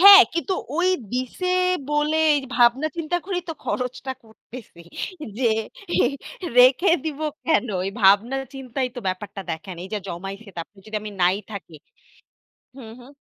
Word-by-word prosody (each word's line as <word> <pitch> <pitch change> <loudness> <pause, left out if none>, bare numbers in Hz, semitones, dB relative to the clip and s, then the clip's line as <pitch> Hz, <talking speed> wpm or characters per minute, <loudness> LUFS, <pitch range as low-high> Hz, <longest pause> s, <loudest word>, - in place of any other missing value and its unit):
হ্যাঁ, 395 +1 +12
কিন্তু 335 +2 0 0.2
ওই 355 +2 +3 0.2
দিছে 255 +8 -2 0.4
বলে, 295 +1 +2 0.2
এই 290 - +2 0.2
ভাবনা 245 +4 +4
চিন্তা 335 +1 -1
করেই 365 -1 -2
তো - - -1
খরচটা 255 +1 -3
করতেছে। 220 -3 -13 0.6
যে 260 - 0 0.5
অ্যা - - +4 0.5
রেখে 255 +9 +7
দিবো 310 -1 -3 0.2
কেন? 320 -6 +2 0.2
এই - - -1
ভাবনা 205 +7 +5 0.2
চিন্তাই 260 -1 -3
তো - - -4
ব্যাপারটা 195 +2 -4
দেখায় 165 +4 -5
না। - - -9
এই 190 - -10
যে - - 0
জমাইছে 195 +5 -6
তারপর 170 +4 -7
যদি 215 0 -4
আমি 215 - -6
নাই 180 +2 +4 0.2
থাকি। 195 -5 -8 1.0
হুম, 230 -5 -10
হুম। 245 +2 -14
250 Hz, 155 wpm, -23 LUFS, 200-295 Hz, 1.0 s, হ্যাঁ